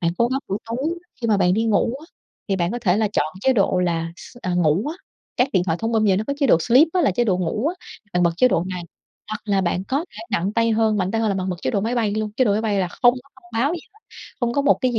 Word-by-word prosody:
Bạn 170 -1 +1
cố 235 0 +3
gắng 265 +1 -1
buổi 195 - -1
tối 230 +1 -4 0.4
khi 235 - -1
mà 215 -2 +3
bạn 180 -1 +3
đi 225 +2 +1
ngủ 225 +2 +1
á, 320 - -13 0.4
thì 195 - +1
bạn 175 0 0
có 240 - -2
thể 190 -6 +2
là 215 0 +1
chọn 150 - +1
chế 265 - +3
độ 195 -5 +2
là 165 -2 -1
s - - -13
à, 180 -1 -1
ngủ 175 +3 +2
á, 315 - -4 0.4
các 250 +2 +3
điện 180 -4 +2
thoại 165 -2 0
thông 225 +1 -1
minh 220 -1 +2
giờ 195 -3 +3
nó 210 - -1
có - - -1
chế 275 - +4
độ 195 - +6
sleep 255 - +5
á, 370 - +2
là 290 - +3
chế 240 +6 +1
độ 190 -5 +1
ngủ 185 - -1
á, 350 - -3 0.4
bạn 180 - +2
bật 170 - +4
chế 255 +7 +5
độ 175 -5 +1
này. 180 -1 -4 0.5
Hoặc 215 - -4
là 200 -2 +1
bạn 180 0 -1
có 275 +8 -1
thể - - -13
nặng 195 0 0
tay 230 +1 +2
hơn, 220 -1 +2
mạnh 185 -2 0
tay 225 +1 0
hơn 220 - +1
là 200 - 0
bạn 190 0 -2
bật 180 - -3
chế - - 0
độ 200 - 0
máy 225 +4 -1
bay 225 -4 +1
luôn, 215 0 -2
chế 255 - +4
độ 210 - +2
máy 210 - +1
bay 215 -3 0
là 185 -2 0
không 245 +6 +3
có 280 - -27
thông 240 -3 -20
báo 285 +7 +1
gì 345 - -5
hết, 430 - -22 0.4
không 235 -1 0
có 280 +3 +1
một 285 - +5
cái 255 -1 +1
gì 225 - 0
215 Hz, 325 wpm, -22 LUFS, 185-240 Hz, 0.5 s, độ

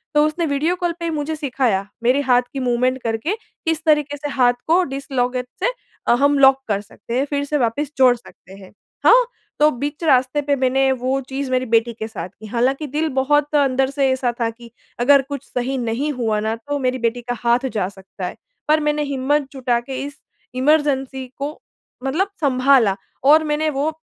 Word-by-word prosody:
तो 295 0 +5
उसने 315 +2 -1
video 305 +4 0
call 350 -1 -1
पे 335 - -4
ही 330 - -1
मुझे 310 +1 -2
सिखाया 250 -9 0 0.2
मेरे 255 +4 +3
हाथ 250 -2 +4
की 275 - -3
मूवमेंट 255 +1 0
करके 230 - -1 0.3
किस 325 -1 0
तरीक़े 295 -2 +2
से 290 +1 -5
हाथ 250 -3 +3
को 340 +3 +4
डिस्लॉकेट 255 -3 -2 0.2
से - - +4 0.4
अ, - - +5
हम 285 +3 +3
लॉक 270 -1 +7
कर 200 -2 0
सकते 210 +3 -10
हैं, 270 - +1
फ़िर 285 0 -2
से 295 +1 0
वापस 265 +4 -1
जोड़ 255 -2 +6
सकते 195 -5 -16
हैं। 195 -1 -13 0.3
हाँ, - - +7 0.3
तो 300 +1 +6
बीच 290 +6 -5
रास्ते 265 -1 +3
पे 285 0 +1
मैंने 265 0 +2
वो 260 +1 0
चीज़ 270 0 -3
मेरी 255 0 +1
बेटी 230 0 +2
के 220 - -3
साथ 185 -5 -6
की। 215 - -10
हालाँकि 260 +6 0
दिल 315 +1 +1
बहुत 295 +2 +2
अंदर 270 -2 +2
से 275 -1 +1
ऐसा 255 -2 0
था 230 - +2
कि 235 0 -13 0.3
अगर 280 +3 +5
कुछ 280 -2 -5
सही 255 +2 -2
नहीं 245 +5 -1
हुआ 225 -5 0
ना 220 +1 -1
तो 285 +6 -4
मेरी 255 -1 0
बेटी 235 +1 -1
का 245 - -1
हाथ 240 +2 +2
जा 200 -4 0
सकता 195 -1 -9
है, - - -5 0.3
पर 305 +1 +4
मैंने 300 0 0
हिम्मत 280 0 0
जुटा 250 -3 0
के 265 - -3
इस 285 0 -9 0.4
इमरजेंसी 265 -2 +1
को 285 +2 -4 0.5
मतलब 320 +9 0
सँभाला 255 -6 +4 0.3
और 305 +3 +6
मैंने 305 +1 0
वो 290 +2 -1
270 Hz, 200 wpm, -20 LUFS, 245-295 Hz, 0.5 s, लॉक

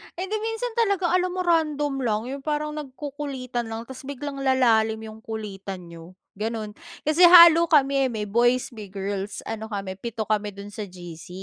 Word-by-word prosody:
Hindi, 380 +4 -3
minsan 450 +2 -3
talaga 400 -6 +2
alam 365 0 +2
mo 370 - -2
random 305 -4 +1
lang. 220 -4 0
'Yong 275 +1 -7
parang 300 0 -1
nagkukulitan 270 -4 -5
lang 225 0 -5
tapos 265 +2 -11
biglang 280 0 -5
lalalim 230 -5 +2
'yong 220 0 -9
kulitan 195 -5 -6
niyo, 170 +2 -12 0.2
ganon. 215 0 -3 0.3
Kasi 310 +4 +5
halo 340 -1 +9
kami 275 -3 +3
eh, - - -4
may 215 - -3
boys, 240 +3 +2
may 215 -4 -9
girls, 195 +1 -4
ano 220 0 -5
kami, 195 -3 -5
pito 230 -1 -4
kami 210 -1 -1
do'n 200 +1 -9
sa 205 +1 -5
GC. 175 -3 -11
240 Hz, 175 wpm, -24 LUFS, 210-300 Hz, 0.3 s, halo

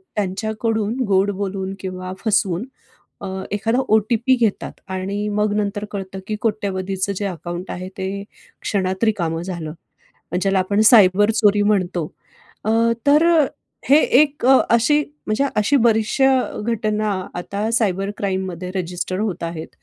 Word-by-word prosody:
त्यांच्याकडून 220 +2 -1
गोड 195 +1 +3
बोलून 195 -1 -3
किंवा 185 -1 -6
फसवून 195 -1 +1 0.6
अ, - - -6 0.3
एखादा 225 +4 0
ओ-टी-पी 220 +4 +3
घेतात 220 -3 0 0.2
आणि 200 +3 -3
मग, 210 0 0
नंतर 205 0 -2
कळतं, 195 -1 -6
की 215 - -2
कोट्यवधींचं, 195 -3 -1
जे 205 - -3
अकाउंट 175 0 -6
आहे 185 +1 -5
ते 195 +1 -4 0.4
क्षणात 190 0 -1
रिकामं 170 -7 0
झालं. 175 -4 -5 0.7
ज्याला 195 0 +2
आपण 200 +3 +1
सायबर 205 -2 +6
चोरी 210 -2 +3
म्हणतो. 185 -5 +1 0.6
अ, 215 - 0 0.4
तर 300 +3 +5 0.6
हे 285 +3 +7 0.2
एक 290 -4 +1
अशी 260 +1 +4 0.3
म्हणजे 215 +6 +1
अशी 215 +7 +3
बरीचशा 255 +4 +2
घटना, 215 -1 -1 0.3
आता 200 +5 -3
सायबर 200 -4 +1
क्राईममध्ये 185 -2 -3
रजिस्टर 180 +1 -3
होत 205 -6 -2
आहेत. 165 -1 -5
200 Hz, 125 wpm, -20 LUFS, 185-220 Hz, 0.7 s, हे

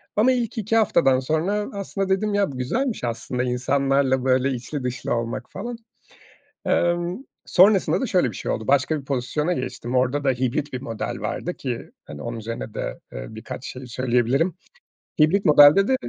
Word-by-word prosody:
ama 225 +5 +4
ilk 240 -4 -1
2 220 +1 0
haftadan 165 -11 +4
sonra, 165 +10 -1
aslında 195 -1 -3
dedim 205 +2 +1
ya 200 -5 +1
bu 130 - -8
güzelmiş 230 - -1
aslında 125 +1 -2
insanlarla 130 +1 +1
böyle 130 +1 +3
içli 130 +3 -5
dışlı 125 0 -2
olmak 115 0 -4
falan. 235 +4 -5 0.9
Emm, 175 +2 +1 0.3
sonrasında 195 +1 +4
da 265 - 0
şöyle 180 - +2
bir 100 - -9
şey - - -4
oldu, 110 - -4
başka 140 +3 +2
bir - - -15
pozisyona 140 +5 -1
geçtim. 125 -4 -4
Orada 130 +3 +1
da 135 - +4
hibrit 130 +3 -1
bir 130 - -4
model 115 -5 -4
vardı - - -3
ki - - -5
hani 75 -1 -9
onun 120 0 -4
üzerine 115 0 -6
de, - - -4
eee, - - -6
birkaç - - -8
şey 130 0 -8
söyleyebilirim. 125 +6 +1 0.7
Hibrit 180 +7 +4
modelde 150 +5 +7
de 265 - +3
140 Hz, 170 wpm, -23 LUFS, 125-190 Hz, 0.9 s, modelde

